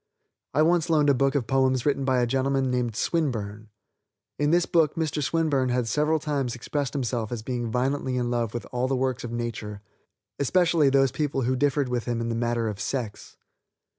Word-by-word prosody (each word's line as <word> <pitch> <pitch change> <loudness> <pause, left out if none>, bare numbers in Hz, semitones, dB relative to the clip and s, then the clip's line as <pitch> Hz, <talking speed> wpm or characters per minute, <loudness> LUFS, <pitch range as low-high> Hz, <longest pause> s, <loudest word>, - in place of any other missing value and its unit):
I 155 - +5
once 170 0 +2
loaned 150 -3 +4
a - - +4
book 135 +2 +1
of 135 -4 +1
poems 130 0 +1
written 140 -2 +1
by 130 -2 +2
a - - +3
gentleman 135 +1 0
named 120 -3 -1
Swinburne. 110 -9 -2 0.7
In 145 0 +2
this 175 +2 +3
book 160 -4 +2
Mr. 155 -2 -1
Swinburne 145 -4 +1
had 125 -1 0
several 150 +7 +2
times 140 -5 -2
expressed 140 +3 -3
himself 120 -5 -2
as 115 -3 -4
being 120 -1 -3
violently 130 +2 -1
in 120 -1 -1
love 120 -3 -1
with 120 - -4
all 125 +1 0
the 135 - 0
works 130 -1 -1
of 120 - -5
nature, 110 -3 -5 0.6
especially 165 0 +3
those 135 -1 +3
people 145 -2 -1
who 130 +2 +1
differed 140 0 +1
with 125 -2 -2
him 120 -1 -1
in 115 0 -2
the - - -1
matter 115 0 0
of 105 -2 -4
sex. 115 -5 -4
130 Hz, 195 wpm, -26 LUFS, 120-145 Hz, 0.7 s, I